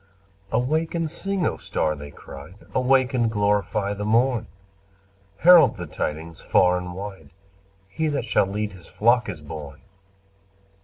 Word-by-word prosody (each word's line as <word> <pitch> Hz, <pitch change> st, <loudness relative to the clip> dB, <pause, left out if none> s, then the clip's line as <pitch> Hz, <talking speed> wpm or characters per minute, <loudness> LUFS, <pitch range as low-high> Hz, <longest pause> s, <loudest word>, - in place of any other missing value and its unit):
"Awake 155 Hz, +9 st, 0 dB
and 165 Hz, -2 st, -1 dB
sing, 195 Hz, 0 st, -2 dB
O -, -, -1 dB
star!" 75 Hz, -, -1 dB
they 70 Hz, 0 st, -9 dB
cried. 70 Hz, +4 st, -12 dB, 0.2 s
"Awake 130 Hz, 0 st, +2 dB
and 120 Hz, -3 st, +2 dB
glorify 105 Hz, -1 st, 0 dB
the 100 Hz, 0 st, -5 dB
morn! 115 Hz, +2 st, +2 dB, 0.9 s
Herald 165 Hz, -, +7 dB
the 90 Hz, -, -5 dB
tidings 80 Hz, +1 st, -5 dB
far 90 Hz, 0 st, +3 dB
and 90 Hz, 0 st, -5 dB
wide 95 Hz, -6 st, -8 dB, 0.6 s
He 155 Hz, +11 st, -2 dB
that 145 Hz, -5 st, -1 dB
shall 105 Hz, -4 st, +2 dB
lead 105 Hz, +2 st, -3 dB
His 90 Hz, -4 st, -12 dB
flock 120 Hz, +1 st, +2 dB
is 90 Hz, -6 st, -6 dB
born!" 75 Hz, -3 st, -9 dB
105 Hz, 145 wpm, -24 LUFS, 90-130 Hz, 0.9 s, Herald